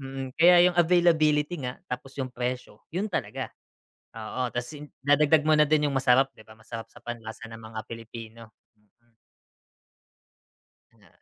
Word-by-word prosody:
Mm, 135 Hz, -1 st, -6 dB
kaya 175 Hz, +2 st, +7 dB
yung 175 Hz, -, -10 dB
availability 165 Hz, -2 st, +3 dB
nga, 125 Hz, -1 st, -4 dB
tapos 125 Hz, +2 st, -6 dB
'yung 130 Hz, -2 st, -3 dB
presyo 125 Hz, -3 st, -4 dB
yun 205 Hz, +4 st, -1 dB
talaga. 130 Hz, -, -3 dB, 0.7 s
Oo, 115 Hz, +3 st, -3 dB
'tas 120 Hz, +3 st, -4 dB
yun 150 Hz, 0 st, -9 dB, 0.2 s
idagdag 150 Hz, +1 st, +4 dB
mo 155 Hz, -, +4 dB
na 150 Hz, -, +5 dB
din 150 Hz, -1 st, +3 dB
'yung 140 Hz, -, -2 dB
masarap, 135 Hz, 0 st, +3 dB
'di -, -, -15 dB
ba, 110 Hz, -, -14 dB
masarap 115 Hz, 0 st, -8 dB
sa -, -, -15 dB
panlasa 115 Hz, -1 st, -7 dB
ng 115 Hz, 0 st, -10 dB
mga 110 Hz, 0 st, -8 dB
Pilipino. 115 Hz, -1 st, -10 dB, 0.2 s
Mm. 110 Hz, +2 st, -37 dB, 1.8 s
Na -, -, -24 dB
130 Hz, 155 wpm, -27 LUFS, 115-150 Hz, 1.8 s, kaya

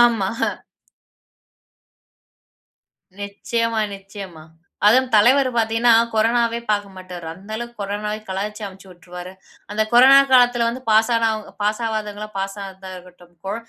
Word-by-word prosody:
ஆமா. 225 Hz, -5 st, +1 dB, 2.9 s
நிச்சயமா, 225 Hz, +3 st, -2 dB, 0.2 s
நிச்சயமா. 195 Hz, -5 st, -11 dB, 0.4 s
அதுவும் 255 Hz, +4 st, +4 dB
தலைவர் 255 Hz, +6 st, +5 dB
பார்த்திங்கன்னா, 230 Hz, +1 st, +3 dB, 0.2 s
கொரோனாவே 230 Hz, +1 st, +2 dB
பார்க்க 205 Hz, -2 st, -1 dB
மாட்டாரு 180 Hz, -2 st, -9 dB
அந்த 195 Hz, +4 st, -15 dB
அளவுக்கு 235 Hz, 0 st, -8 dB
கொரோனாவை 210 Hz, +1 st, -3 dB
கலாய்ச்சு 210 Hz, +3 st, -4 dB
அமுச்சி 195 Hz, 0 st, -12 dB
உட்டுருவாரு, 180 Hz, +1 st, -10 dB, 0.4 s
அந்த 210 Hz, +1 st, 0 dB
கொரோனா 260 Hz, +3 st, +8 dB
காலத்தில 245 Hz, -2 st, +5 dB
வந்து 250 Hz, +2 st, -5 dB
பாஸ்னா 225 Hz, +1 st, +3 dB, 0.3 s
பாஸ் 210 Hz, +2 st, 0 dB
ஆவாதவங்களா 215 Hz, -1 st, -4 dB
பாஸா 195 Hz, +1 st, -4 dB, 0.3 s
இருக்கட்டும் 180 Hz, -1 st, -16 dB
கொழ, 195 Hz, -, -2 dB
210 Hz, 110 wpm, -21 LUFS, 195-235 Hz, 2.9 s, கொரோனா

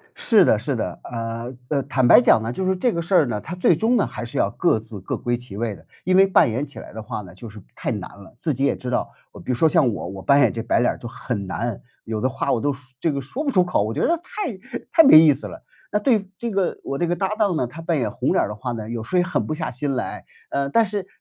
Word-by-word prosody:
是 -, -, +4 dB
的 -, -, +4 dB
是 -, -, -2 dB
的， -, -, -4 dB
呃， 115 Hz, +1 st, -5 dB, 0.2 s
呃， 140 Hz, -2 st, 0 dB
坦 135 Hz, -2 st, +1 dB
白 125 Hz, -, +8 dB
讲 115 Hz, -2 st, +4 dB
呢， 115 Hz, +1 st, -3 dB
就 190 Hz, -, -3 dB
是 190 Hz, 0 st, +1 dB
这 235 Hz, +6 st, +1 dB
个 170 Hz, -, -2 dB
事 175 Hz, +4 st, -2 dB
儿 160 Hz, -, +5 dB
呢， 105 Hz, -4 st, -3 dB
它 170 Hz, -, -7 dB
最 180 Hz, -2 st, +3 dB
终 225 Hz, +8 st, +2 dB
呢， -, -, +2 dB
还 -, -, -6 dB
是 120 Hz, -, -5 dB
要 100 Hz, -, +2 dB
各 170 Hz, -, +1 dB
自 110 Hz, -2 st, -9 dB
各 95 Hz, -, -3 dB
归 120 Hz, 0 st, -1 dB
其 120 Hz, -5 st, -10 dB
位 110 Hz, -1 st, -2 dB
的， -, -, -17 dB, 0.2 s
因 185 Hz, 0 st, +3 dB
为 195 Hz, +1 st, +7 dB
扮 190 Hz, -10 st, +4 dB
演 130 Hz, +6 st, -2 dB
起 140 Hz, -, -12 dB
来 -, -, -10 dB
的 110 Hz, -, -7 dB
话 105 Hz, -, -5 dB
呢， 90 Hz, -4 st, -13 dB
就 115 Hz, -, -10 dB
是 105 Hz, 0 st, -11 dB
太 -, -, -3 dB
难 -, -, -4 dB
了， 95 Hz, -, -16 dB
自 160 Hz, -, 0 dB
己 135 Hz, +2 st, -1 dB
也 -, -, +2 dB
知 125 Hz, -, -6 dB
道， 125 Hz, -, -1 dB, 0.3 s
比 130 Hz, -, -1 dB
如 -, -, +1 dB
说 160 Hz, +7 st, +3 dB
像 150 Hz, -7 st, +3 dB
我 95 Hz, -, -5 dB
我 95 Hz, +1 st, -8 dB
扮 140 Hz, +8 st, +4 dB
演 -, -, +4 dB
这 115 Hz, -, -4 dB
白 -, -, +1 dB
脸 120 Hz, -, +3 dB
儿 -, -, -11 dB
就 120 Hz, -, -7 dB
很 115 Hz, -3 st, -4 dB
难， 115 Hz, +3 st, -3 dB, 0.2 s
有 110 Hz, -1 st, -3 dB
的 130 Hz, -, +1 dB
话 135 Hz, +1 st, -1 dB
我 115 Hz, -, +1 dB
都 145 Hz, +3 st, +1 dB
说 135 Hz, 0 st, -11 dB, 0.2 s
这 165 Hz, -, +1 dB
个 140 Hz, -, -2 dB
说 230 Hz, -, -5 dB
不 285 Hz, -, +1 dB
出 185 Hz, -8 st, +4 dB
口， 175 Hz, -, +1 dB
我 110 Hz, +2 st, -2 dB
觉 -, -, -2 dB
得 340 Hz, -, +2 dB
太 320 Hz, -, -6 dB
太 325 Hz, -, +8 dB
没 275 Hz, -, +9 dB
意 155 Hz, -1 st, +7 dB
思 140 Hz, -, -5 dB
了。 -, -, -10 dB, 0.3 s
那 210 Hz, -, +1 dB
对 210 Hz, -3 st, +1 dB
这 235 Hz, +3 st, -4 dB
个 195 Hz, -3 st, -1 dB
我 135 Hz, -, -3 dB
这 175 Hz, -, +1 dB
个 175 Hz, +1 st, 0 dB
搭 190 Hz, 0 st, 0 dB
档 210 Hz, -4 st, +1 dB
呢， 125 Hz, -, 0 dB
他 140 Hz, +7 st, -10 dB
扮 165 Hz, -1 st, 0 dB
演 125 Hz, -, -1 dB
红 125 Hz, +2 st, -1 dB
脸 -, -, +3 dB
儿 -, -, -1 dB
的 105 Hz, -, -5 dB
话 125 Hz, +3 st, -4 dB
呢， 110 Hz, -2 st, -6 dB
有 115 Hz, -1 st, -4 dB
时 180 Hz, -, -2 dB
候 -, -, +5 dB
也 -, -, +1 dB
狠 180 Hz, -, -1 dB
不 155 Hz, -, -2 dB
下 155 Hz, -, -3 dB
心 135 Hz, +3 st, -2 dB
来， 125 Hz, -, -4 dB, 0.3 s
呃， 140 Hz, 0 st, -1 dB
但 225 Hz, +11 st, +3 dB
是 200 Hz, -2 st, -4 dB
140 Hz, 330 characters per minute, -22 LUFS, 115-180 Hz, 0.3 s, 没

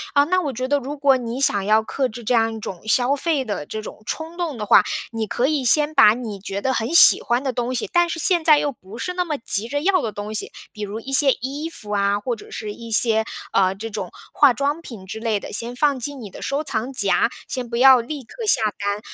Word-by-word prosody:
啊， 285 Hz, -, +6 dB
那 370 Hz, +4 st, +1 dB
我 290 Hz, -, -3 dB
觉 255 Hz, +1 st, -4 dB
得 285 Hz, +1 st, +1 dB
如 285 Hz, +3 st, -7 dB
果 275 Hz, -2 st, +3 dB
你 240 Hz, +1 st, -5 dB
想 205 Hz, -7 st, +2 dB
要 215 Hz, +1 st, +3 dB
克 260 Hz, +3 st, -2 dB
制 235 Hz, +2 st, -10 dB
这 250 Hz, -, 0 dB
样 225 Hz, -1 st, +2 dB
一 -, -, -7 dB
种 185 Hz, -4 st, -7 dB
消 245 Hz, +6 st, +2 dB
费 290 Hz, -2 st, -1 dB
的 205 Hz, -8 st, -4 dB
这 220 Hz, -, -5 dB
种 215 Hz, -, -10 dB
冲 320 Hz, +2 st, -5 dB
动 335 Hz, -7 st, -4 dB
的 210 Hz, -, -4 dB
话， -, -, +6 dB, 0.3 s
你 225 Hz, -1 st, -3 dB
可 240 Hz, -, -1 dB
以 290 Hz, -1 st, 0 dB
先 300 Hz, +5 st, +3 dB
把 215 Hz, -7 st, +6 dB
你 225 Hz, -5 st, -6 dB
觉 195 Hz, 0 st, -5 dB
得 260 Hz, -, +1 dB
很 225 Hz, -1 st, -2 dB
喜 -, -, +9 dB
欢 240 Hz, +3 st, -1 dB
的 260 Hz, -2 st, -2 dB
东 245 Hz, +1 st, -2 dB
西， 240 Hz, -, -2 dB
但 345 Hz, -1 st, +3 dB
是 330 Hz, -, -3 dB
现 345 Hz, 0 st, +2 dB
在 310 Hz, -2 st, +6 dB
又 290 Hz, -, -1 dB
不 215 Hz, -3 st, -13 dB
是 360 Hz, -, -4 dB
那 360 Hz, 0 st, -1 dB
么 305 Hz, -4 st, -4 dB
急 225 Hz, -2 st, -1 dB
着 285 Hz, +3 st, -2 dB
要 370 Hz, 0 st, +2 dB
的 220 Hz, -, -3 dB
东 205 Hz, +1 st, -7 dB
西， 215 Hz, -, -2 dB, 0.2 s
比 210 Hz, -, -11 dB
如 205 Hz, +2 st, -5 dB
一 270 Hz, +4 st, -9 dB
些 275 Hz, 0 st, +7 dB
衣 280 Hz, +6 st, -5 dB
服 210 Hz, -10 st, -7 dB
啊， 200 Hz, 0 st, +1 dB
或 235 Hz, +3 st, -3 dB
者 -, -, -14 dB
是 210 Hz, -1 st, -6 dB
一 230 Hz, +1 st, -11 dB
些， 220 Hz, 0 st, +3 dB, 0.3 s
呃， 190 Hz, -1 st, +2 dB
这 220 Hz, +3 st, -7 dB
种 200 Hz, -4 st, -5 dB, 0.2 s
化 285 Hz, -3 st, +5 dB
妆 285 Hz, +7 st, -2 dB
品 215 Hz, -, -10 dB
之 210 Hz, +4 st, -7 dB
类 220 Hz, -2 st, -1 dB
的， -, -, -9 dB
先 235 Hz, +3 st, -2 dB
放 280 Hz, -1 st, +1 dB
进 285 Hz, +3 st, -5 dB
你 210 Hz, -6 st, -9 dB
的 -, -, -11 dB
收 280 Hz, +2 st, -2 dB
藏 245 Hz, -2 st, -3 dB
夹， 200 Hz, -3 st, +2 dB, 0.2 s
先 250 Hz, -2 st, -5 dB
不 235 Hz, -, -3 dB
要 260 Hz, 0 st, +7 dB
立 275 Hz, +3 st, -7 dB
刻 455 Hz, -, -10 dB
下 245 Hz, -, +4 dB, 0.2 s
单。 205 Hz, 0 st, -2 dB
245 Hz, 280 characters per minute, -21 LUFS, 215-285 Hz, 0.3 s, 喜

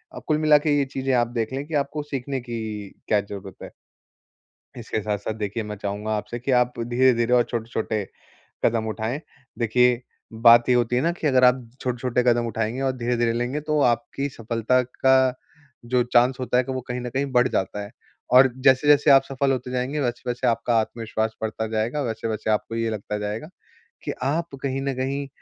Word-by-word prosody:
अ, -, -, -6 dB
कुल 155 Hz, -, +2 dB
मिला 155 Hz, -1 st, +6 dB
के 145 Hz, -1 st, +3 dB
ये 140 Hz, -, +2 dB
चीज़ें 135 Hz, 0 st, 0 dB
आप 120 Hz, -1 st, +2 dB
देख 115 Hz, +2 st, -2 dB
लें 135 Hz, +2 st, -3 dB
कि 165 Hz, -, -9 dB
आपको 150 Hz, +1 st, -5 dB
सीखने 135 Hz, -2 st, -4 dB
की 120 Hz, -1 st, -5 dB, 0.5 s
क्या 105 Hz, -1 st, +3 dB
ज़रूरत 100 Hz, -2 st, -9 dB
है? -, -, -9 dB, 1.1 s
इसके 110 Hz, -1 st, -3 dB
साथ-साथ, 105 Hz, +1 st, -3 dB
देखिए, 105 Hz, +1 st, -3 dB
मैं 105 Hz, 0 st, -6 dB
चाहूँगा 105 Hz, +2 st, -4 dB
आपसे 120 Hz, +3 st, -5 dB
कि 130 Hz, +3 st, -3 dB
आप 125 Hz, 0 st, +3 dB
धीरे-धीरे 120 Hz, 0 st, +2 dB
और 125 Hz, -, +5 dB
छोटे-छोटे 110 Hz, -2 st, -2 dB, 0.6 s
कदम 115 Hz, -1 st, +1 dB
उठाएँ। 110 Hz, +5 st, -3 dB, 0.4 s
देखिए, 125 Hz, +1 st, +3 dB, 0.3 s
बात 115 Hz, +2 st, +6 dB
ये 125 Hz, -, +5 dB
होती 120 Hz, 0 st, +1 dB
है 125 Hz, -, +2 dB
ना, 165 Hz, +4 st, +2 dB
कि 170 Hz, -2 st, -2 dB
अगर 130 Hz, -2 st, +3 dB
आप 125 Hz, -1 st, +4 dB
छोटे-छोटे 125 Hz, 0 st, -1 dB
कदम 120 Hz, -1 st, +2 dB
उठाएँगे 115 Hz, +3 st, -2 dB
और 135 Hz, -1 st, +1 dB
धीरे-धीरे 120 Hz, -1 st, 0 dB
लेंगे, 120 Hz, +5 st, -2 dB
तो 150 Hz, 0 st, 0 dB
आपकी 125 Hz, +3 st, 0 dB
सफलता 115 Hz, +1 st, 0 dB
का 130 Hz, +1 st, +3 dB, 0.5 s
जो 125 Hz, +1 st, +2 dB
चांस 125 Hz, +2 st, +4 dB
होता 125 Hz, -1 st, 0 dB
है, 125 Hz, -, +4 dB
क 130 Hz, -, -12 dB
वो 130 Hz, -1 st, -2 dB
कहीं 125 Hz, 0 st, -3 dB
न 125 Hz, -, -4 dB
कहीं 135 Hz, +3 st, -1 dB
बढ़ 125 Hz, 0 st, +4 dB
जाता 105 Hz, -1 st, -2 dB
है, 100 Hz, -, -10 dB, 0.4 s
और 130 Hz, +1 st, +7 dB
जैसे-जैसे 140 Hz, +2 st, +5 dB
आप 135 Hz, -1 st, +7 dB
सफल 135 Hz, 0 st, -1 dB
होते 125 Hz, -1 st, -3 dB
जाएँगे, 130 Hz, +4 st, -2 dB
वैसे-वैसे 125 Hz, -1 st, -2 dB
आपका 115 Hz, 0 st, +1 dB
आत्मविश्वास 110 Hz, 0 st, -2 dB
बढ़ता 110 Hz, 0 st, -3 dB
जाएगा, 110 Hz, +6 st, -1 dB
वैसे-वैसे 110 Hz, -3 st, -3 dB
आपको 110 Hz, +1 st, -1 dB
ये 115 Hz, 0 st, 0 dB
लगता 105 Hz, -1 st, -4 dB
जाएगा 105 Hz, +8 st, -4 dB, 0.5 s
कि -, -, -3 dB
आप 150 Hz, +2 st, -1 dB
कहीं 135 Hz, 0 st, -1 dB
न 135 Hz, 0 st, -1 dB
कहीं 135 Hz, +2 st, -2 dB
125 Hz, 190 wpm, -24 LUFS, 115-130 Hz, 1.1 s, और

